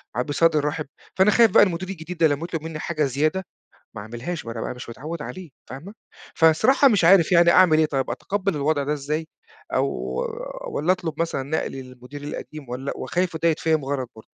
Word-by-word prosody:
ع 125 - +1
بصدر 150 +2 +2
رحِب، 150 0 -3 0.3
فأنا 190 +3 +4
خايف 230 +1 +5
بقى - - +7
المدير 185 0 -2
الجديد 180 -1 -7
ده 160 -1 +5
لمّا 145 +2 -2
يطلُب 170 -2 -4
منّي 160 -1 -6
حاجة 155 -1 -1
زيادة 155 +8 0 0.5
ما 110 - -6
اعملهاش، 120 +8 -6
ما 115 - -4
أنا 115 - -6
بقى - - -4
مش 125 - -10
متعوّد 150 +7 -6
عليه 160 +7 -8 0.2
فاهمة، 155 - -9 0.4
فالصراحة 210 - +5
مش 205 -8 +2
عارف 180 0 +6
يعني 170 0 +6
أعمل 170 -4 +5
إيه 155 - +4
طيب، 135 -3 -2
أتقبّل 195 -4 -2
الوضْع 145 0 +1
ده 150 - -1
إزاي 150 +2 -3 0.5
أو - - +2 0.8
والّا 180 - +1
أطلُب 165 -4 -4
مثلًا 165 -5 -1
نقلي 135 -1 -3
للمدير 130 +3 -11
القديم، 150 -1 -7
والّا 130 +3 -4
وخايف 180 -1 -2
وده 165 +1 +1
يتفهَم 160 -2 +1
غلَط 135 -3 -3
برضه. 110 - -14
155 Hz, 195 wpm, -23 LUFS, 140-175 Hz, 0.8 s, بقى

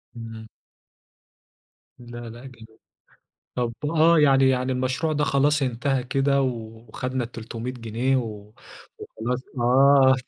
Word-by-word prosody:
إمم. 115 -1 -9 1.5
لا، 120 0 -10
لا 120 +3 -11
جميل. 115 -4 -13 0.9
طب 120 -2 -1
آه، 165 +1 +4
يعني 135 -2 +5
يعني 130 0 0
المشروع 130 +5 -1
ده 150 0 0
خلاص 145 +1 +2
انتهى 130 +1 -1
كده 140 +1 +1
وخدنا 120 +1 -4
ال300 115 +1 -6
جنيه 120 +2 -1
و 105 -3 -6 0.5
وخلاص، 125 +3 -4 0.2
آه، 130 +2 +5
125 Hz, 110 wpm, -24 LUFS, 115-135 Hz, 1.5 s, يعني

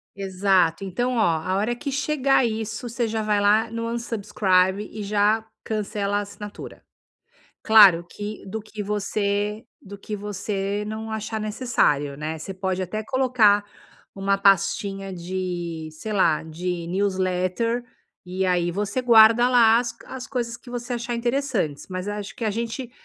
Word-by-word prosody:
Exato, 190 -3 +1
então 240 +7 -1
olha, 225 - +3 0.2
a 185 - +1
hora 215 +5 0
que 280 +4 -5
chegar 275 -1 +2
isso 225 +1 -3
você 235 0 -1
já 220 0 -2
vai 210 -1 +1
lá 215 +2 +3
no 230 0 -3
unsubscribe 205 -4 0
e 215 - -6
já 210 +2 +2 0.2
cancela 205 -2 -2
a - - 0
assinatura. 205 0 -9 0.8
Claro 200 -6 +7
que 210 +1 -7
do 220 +3 -4
que 215 0 -7
você 205 +1 -1 0.2
do 200 0 -10
que 210 +1 -6
você 205 0 -3
não 220 +1 -5
achar 220 0 -3
necessário, 210 - 0
né, 155 +2 -4
você 160 +5 -7
pode 190 0 -2
até 215 +4 -4
colocar 235 -5 +3 0.5
uma 195 0 0
pastinha 195 0 +1
de, 175 -2 -4
sei 215 +8 -6
lá, 170 -6 +3
de 170 +2 -4
newsletter 190 +4 0 0.4
e 185 +1 -2
aí 175 -2 +1
você 205 +6 -2
guarda 235 0 +6
lá 230 -2 +6
as 235 -1 -2
co 230 0 -18
as 260 -1 -7
coisas 235 -3 -3
que 240 - -17
você 245 0 -4
achar 240 0 -3
interessantes, 235 - -1
mas 185 +1 -4
acho 205 -1 -5
que 235 - -4
a 215 - +1
gente, 235 +3 -4
210 Hz, 155 wpm, -24 LUFS, 190-230 Hz, 0.8 s, Claro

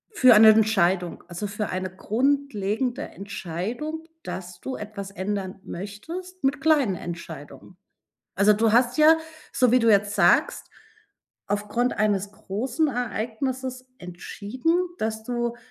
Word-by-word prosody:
für 255 - +7
eine 220 +1 +9
Entscheidung, 195 -5 +2
also 175 +4 -5
für 205 +1 -4
eine 185 0 -3
grundlegende 245 -1 0
Entscheidung, 200 - -5 0.2
dass 180 -1 -7
du 260 - -4
etwas 210 -2 -7
ändern 195 -1 -4
möchtest 325 - -8
mit 275 +1 +1
kleinen 290 -11 +3
Entscheidungen. 165 -1 -9 0.6
Also, 205 +2 +5
du 220 +1 +2
hast 245 +1 +3
ja, 315 +1 +7 0.3
so 250 -2 +3
wie 255 - +6
du 230 -1 +3
jetzt 205 0 +3
sagst, - - +3 0.8
aufgrund 210 +5 -1
eines 205 -2 +1
großen 240 +11 -2
Ereignisses 250 +1 -3
entschieden, 205 - -3 0.3
dass 220 0 -2
du 240 0 -2
215 Hz, 120 wpm, -25 LUFS, 195-255 Hz, 0.8 s, eine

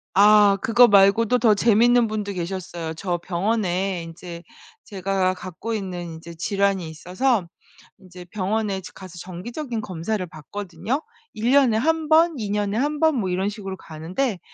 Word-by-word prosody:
아 205 0 +6
그거 240 +2 +6
말고도 205 +4 +4
더 220 -3 +4
재밌는 235 +3 +4
분도 210 -2 -3
계셨어요. 170 -2 -5
저 175 +1 -2
병원에 185 0 -1
인제 170 +1 -9 0.4
제가 190 -2 -1
갖고 185 +5 -6
있는 185 -4 -4
인제 165 0 -9
질환이 195 0 0
있어서 180 +6 -1 0.5
인제 180 -1 -13
병원에 200 +1 -2
가서 185 -2 -11
정기적인 225 - -6
검사를 185 +2 -3
받거든요. 180 - -5 0.3
1 225 +3 -1
년에 265 -5 +4
1 320 +5 0
번, 325 0 +5
2 210 -3 -4
년에 205 0 -1
1 295 +4 -1
번 320 -2 +3
뭐 190 -3 -1
이런 190 +3 0
식으로 195 -3 -6
가는데 180 - -4
200 Hz, 285 characters per minute, -23 LUFS, 180-225 Hz, 0.5 s, 아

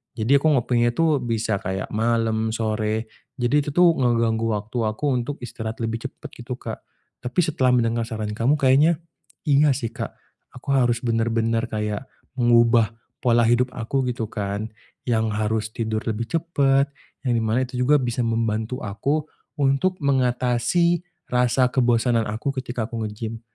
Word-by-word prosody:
Jadi 125 +5 +3
aku 155 - +1
ngopinya 120 -1 +2
itu 160 0 +2
bisa 115 -3 -1
kayak 95 0 -4
malem, 110 0 0
sore, 110 0 -1 0.3
jadi 130 +3 +2
itu 145 - -4
tuh 175 0 +5
ngeganggu 115 -3 +1
waktu 105 +4 -5
aku 110 +7 -3
untuk 130 +4 -4
istirahat 110 -1 -6
lebih 115 +1 -3
cepet - - -12
gitu 120 +1 -6
Kak. - - -7 0.4
Tapi 125 +6 -3
setelah 135 -6 +2
mendengar 115 -1 +1
saran 110 -3 -4
kamu 115 +7 +2
kayaknya 145 +5 +4 0.4
inga 145 -1 +4
sih 120 -4 -3
Kak, - - -5 0.4
aku 125 +2 -10
harus 120 -3 +2
bener-bener 115 0 +1
kayak 105 +2 -3 0.3
mengubah 115 -2 +4 0.3
pola 120 -2 +3
hidup 120 +2 +2
aku 130 +3 -1
gitu 115 -3 -3
kan, 105 +1 -3 0.3
yang 110 -3 0
harus 110 +1 -1
tidur 110 -1 -2
lebih 115 +1 -2
cepet, 140 -5 +2 0.4
yang 125 - +2
di 115 - +1
mana 115 +4 +1
itu 125 0 -6
juga 145 +4 +5
bisa 125 -1 -1
membantu 115 +1 -1
aku 140 +10 -1 0.3
untuk 140 +6 +1
mengatasi 130 +5 +2 0.3
rasa 125 +1 +2
kebosanan 120 -2 +2
aku 115 +6 -2
ketika 120 -3 -3
aku 115 -1 -4
nge-gym. 110 +1 -6
120 Hz, 155 wpm, -23 LUFS, 110-130 Hz, 0.4 s, tuh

